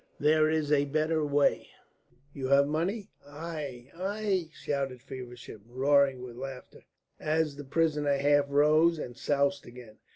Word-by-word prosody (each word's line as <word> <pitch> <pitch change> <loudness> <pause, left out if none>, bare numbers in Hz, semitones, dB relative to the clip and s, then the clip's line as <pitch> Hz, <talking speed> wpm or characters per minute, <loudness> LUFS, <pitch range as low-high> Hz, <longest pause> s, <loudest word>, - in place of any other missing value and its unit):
"There 155 +1 +4
is 155 -2 0
a 145 -1 +4
better 155 +2 0
way. 145 -1 +2 0.7
You 130 -2 -4
have 140 +1 +5
money?" 185 +8 -2
"Ai, 145 -4 -7
ai!" 190 -1 -2
shouted 135 -4 -3
Feversham, 125 -4 -10
roaring 135 +1 +2
with 120 -2 -9
laughter, 130 0 -9 0.3
as 155 -1 0
the 145 - -8
prisoner 150 -1 +1
half 145 +1 +3
rose 155 +4 +4
and 120 -5 -6
soused 140 +1 0
again. 120 -3 -13
145 Hz, 135 wpm, -29 LUFS, 135-155 Hz, 0.7 s, have